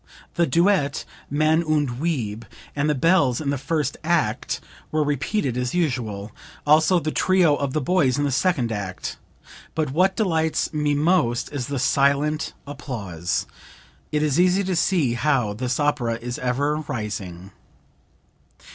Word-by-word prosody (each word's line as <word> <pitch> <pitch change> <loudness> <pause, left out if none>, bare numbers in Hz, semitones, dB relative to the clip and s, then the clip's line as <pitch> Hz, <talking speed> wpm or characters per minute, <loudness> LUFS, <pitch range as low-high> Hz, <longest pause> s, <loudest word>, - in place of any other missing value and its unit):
The 170 -1 +2
duet, 165 -1 +2 0.2
'Mann 155 +3 +2
und 145 -6 0
Weib,' 115 -10 -2 0.3
and 145 +1 +1
the 150 - +2
bells 165 -4 +3
in 145 -3 -1
the - - 0
first 145 0 -1
act, 155 -10 0 0.3
were 155 0 +2
repeated 145 - -1
as 125 +5 -2
usual, 115 - -2 0.3
also 155 +4 +5
the 155 -1 -2
trio 180 -5 +3
of 140 -2 -2
the 155 - 0
boys 140 -3 +2
in 145 - 0
the 145 - 0
second 130 -4 +1
act. 95 -3 -4 0.6
But 155 -4 -1
what 185 +6 +2
delights 160 -8 0
me 150 -1 +1
most 145 -6 +1
is 130 -4 -3
the 140 - -3
silent 140 +4 +1
applause! 100 - -4 0.7
It 150 0 +1
is 150 +1 +1
easy 185 +2 +4
to 185 -1 -1
see 165 -7 +2
how 120 -4 +1
this 125 +4 -2
opera 145 -6 +1
is 120 +1 -5
ever 140 +4 0
rising." 100 - -5
145 Hz, 145 wpm, -23 LUFS, 125-160 Hz, 0.7 s, also